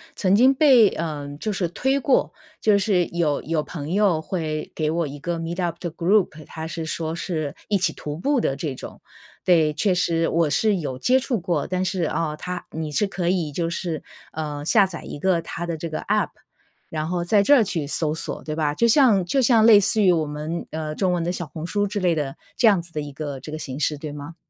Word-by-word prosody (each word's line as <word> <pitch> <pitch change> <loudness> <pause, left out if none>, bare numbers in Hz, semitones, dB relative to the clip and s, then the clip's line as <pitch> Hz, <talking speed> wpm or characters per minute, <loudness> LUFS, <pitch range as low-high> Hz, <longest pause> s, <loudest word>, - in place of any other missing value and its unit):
曾 190 0 +2
经 255 +5 +6
被， 260 -7 +6
呃， 155 -5 -4
就 215 - -2
是 190 -3 -1
推 265 +9 0
过。 265 0 +2 0.3
就 210 -2 +4
是 185 -3 +2
有 160 -4 -1
有 160 -1 0
朋 150 -1 -6
友 195 -6 +3
会 155 -4 -3
给 155 -1 -1
我 165 -1 0
一 145 +1 -8
个 170 +2 -3
Meetup 170 +1 -2
的 175 - -4
group， 170 -2 +1
他 160 0 -7
是 165 0 -5
说 160 0 -3
是 155 -5 -3
一 205 - +2
起 185 - 0
徒 150 0 -6
步 275 - +1
的 135 - 0
这 145 -1 -3
种。 - - -10 0.4
对， 160 -4 +4
确 190 +4 +1
实 165 -2 +1
我 165 -2 +2
是 210 +5 +2
有 140 -7 -4
接 255 - +3
触 255 -4 -1
过。 170 -5 -1
但 185 0 -1
是， 185 -2 -1
啊， 155 -1 -1
它 180 +2 -6
你 155 -1 -4
是 205 +8 +1
可 180 -3 -3
以 175 -5 0
就 165 +3 -2
是， 170 -2 -4 0.3
呃， 150 -2 -4
下 200 +4 +5
载 170 -3 -8
一 145 - -7
个 185 -1 +2
它 170 +1 -5
的 165 -1 -3
这 165 +2 -5
个 155 - -3
App， - - +1 0.6
然 155 0 -3
后 175 0 -1
在 200 +3 +3
这 290 +7 +6
儿 240 - +5
去 165 -7 -2
搜 155 +1 -1
索， - - -6
对 155 -1 -4
吧？ 150 -2 0
就 235 +8 +2
像 225 -7 +5
就 185 +10 +1
像 230 -3 +5
类 220 -3 +9
似 205 +2 +2
于 185 -3 +5
我 160 -2 +1
们， 150 +3 -4
呃， 155 -1 -4
中 185 -2 +1
文 175 -2 0
的 175 - -1
小 175 -2 -4
红 155 +2 -7
书 205 +2 0
之 205 +1 -3
类 180 -3 +2
的， 145 -3 -3 0.2
这 235 - +5
样 195 -5 +4
子 170 - -15
的 155 - -3
一 145 -1 -7
个 145 -2 -5
这 150 - -9
个 155 - -5
形 135 -2 -6
式， 150 0 0
对 150 -1 -6
吗？ 145 +2 -8
170 Hz, 280 characters per minute, -23 LUFS, 155-195 Hz, 0.6 s, 类